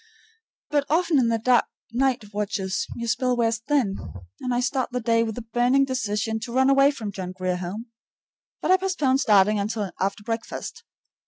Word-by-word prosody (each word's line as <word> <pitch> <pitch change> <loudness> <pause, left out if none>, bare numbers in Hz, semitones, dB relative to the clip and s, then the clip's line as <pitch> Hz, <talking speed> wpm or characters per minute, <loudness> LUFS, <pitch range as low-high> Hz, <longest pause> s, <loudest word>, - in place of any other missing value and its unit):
But 290 -1 +2
often 330 -1 +3
in 240 - +3
the 230 +2 +3 0.3
night 245 -4 0
watches 195 -2 -2
your 235 0 -4
spell 250 +2 +1
wears 230 -1 +1
thin, 235 -6 0 0.4
and 250 - -3
I 245 - +1
start 265 0 0
the 250 - -1
day 230 -1 +2
with 220 -2 -2
the 245 - -6
burning 245 +4 +2
decision 220 -4 -2
to 235 - -7
run 265 +2 +3
away 275 +1 +6
from 235 -8 -4
the - - -5
John 185 -2 -6
Grier 185 -1 -2
Home. 185 +6 -5 0.8
But - - +2
I 375 - +7
postpone 330 -9 +1
starting 210 -4 +4
until 205 -1 -2
after 200 +2 -1
breakfast. 230 - -5
235 Hz, 180 wpm, -24 LUFS, 210-265 Hz, 0.8 s, I